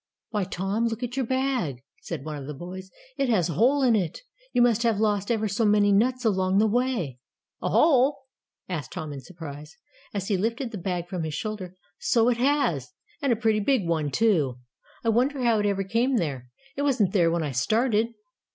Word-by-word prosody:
"Why, 210 -4 0
Tom, 195 +5 -1
look 230 +1 -4
at 245 0 -3
your 265 -3 -1
bag," 255 - -1 0.2
said 135 - -6
one 155 -1 -4
of 140 -1 -8
the 150 - -5
boys. 185 +5 -8 0.3
"It 275 -2 +1
has 185 -8 +2
a - - -2
hole 260 - +3
in 240 -3 +5
it. 185 - -1 0.3
You - - +1
must 235 -2 +3
have 230 -3 +2
lost 205 -2 +1
ever 220 -2 +1
so 205 +3 0
many 205 -1 +4
nuts 250 +5 +2
along 190 -2 +2
the 215 - +5
way." 220 - 0 0.4
"A - - -1
hole?" 275 -2 +4 0.5
asked 165 -6 -5
Tom 155 -2 -5
in 140 - -7
surprise, 150 -3 -10 0.3
as 195 -2 -3
he 200 - +1
lifted 230 +5 -2
the 210 - -5
bag 175 -1 -3
from 180 -1 -4
his 155 -2 -3
shoulder. 195 -2 -5 0.2
"So 235 0 +3
it 240 - +1
has 240 - +1 0.3
and 280 -3 +1
a - - +4
pretty 220 -1 +1
big 210 -3 +1
one, 160 -3 0
too. 155 - +2 0.5
I 230 - +1
wonder 255 +4 +1
how 230 -3 +3
it 205 - +1
ever 195 -1 0
came 235 +7 +1
there. 135 - -3 0.3
It 280 - -3
wasn't 245 -10 +2
there 175 -5 +4
when 170 0 0
I 145 - -2
started." 220 - +2
210 Hz, 205 wpm, -26 LUFS, 175-240 Hz, 0.5 s, in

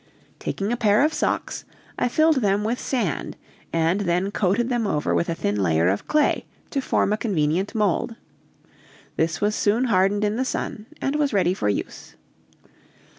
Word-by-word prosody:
Taking 200 +3 -3
a 240 - 0
pair 215 +1 +4
of 310 +1 +2
socks, 300 - -1 0.4
I - - +2
filled 310 +4 +3
them 205 -4 +1
with 230 +3 -1
sand 225 - -2 0.3
and 165 +3 +1
then 180 +1 0
coated 205 +4 +1
them 240 -4 0
over 150 -6 0
with 170 - +1
a 165 - -1
thin 100 -8 -1
layer 85 -2 +2
of 100 +2 -2
clay 305 0 +2 0.2
to 275 - 0
form 210 - +1
a - - 0
convenient 185 -2 0
mold; 220 +3 0 1.0
this 160 0 0
was 210 +1 +2
soon 215 +4 +2
hardened 205 -2 +2
in 210 +1 0
the 260 - +1
sun, 220 -4 -4
and 275 +2 0
was 290 -4 +1
ready 185 -3 +3
for 105 - -1
use. 100 - -4
205 Hz, 175 wpm, -23 LUFS, 175-240 Hz, 1.0 s, pair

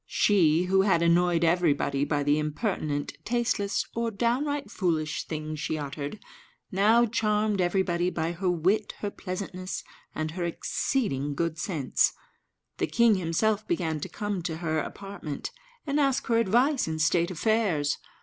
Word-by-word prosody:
She, 170 -5 +3
who 190 +1 +3
had 190 -4 +3
annoyed 170 0 +3
everybody 160 -5 +2
by 145 -1 0
the 145 +1 +2
impertinent, 150 -2 -2
tasteless, 235 -4 0
or 230 0 -1
downright 265 +7 -1
foolish 155 -5 -1
things 155 -1 -4
she 155 - -2
uttered, 145 +4 -5 0.5
now 215 +5 +4
charmed 210 -3 +1
everybody 175 -1 +1
by 165 -2 -2
her 180 +2 -1
wit, 180 +5 +1
her 205 - -2
pleasantness, 185 -1 -5 0.3
and 155 0 -2
her 175 +2 -4
exceeding 165 - -1
good 165 +1 -2
sense. 160 -8 +1 0.7
The - - +1
king 235 -1 +4
himself 200 +4 0
began 160 -3 -1
to - - -5
come 205 -3 -3
to 165 -2 -3
her 160 -2 -1
apartment, 195 -6 -6 0.3
and 290 0 0
ask 275 -2 +2
her 230 -1 +2
advice 245 - +2
in 160 0 -2
state 170 +2 +2
affairs. 185 -5 +1
180 Hz, 145 wpm, -27 LUFS, 155-210 Hz, 0.7 s, now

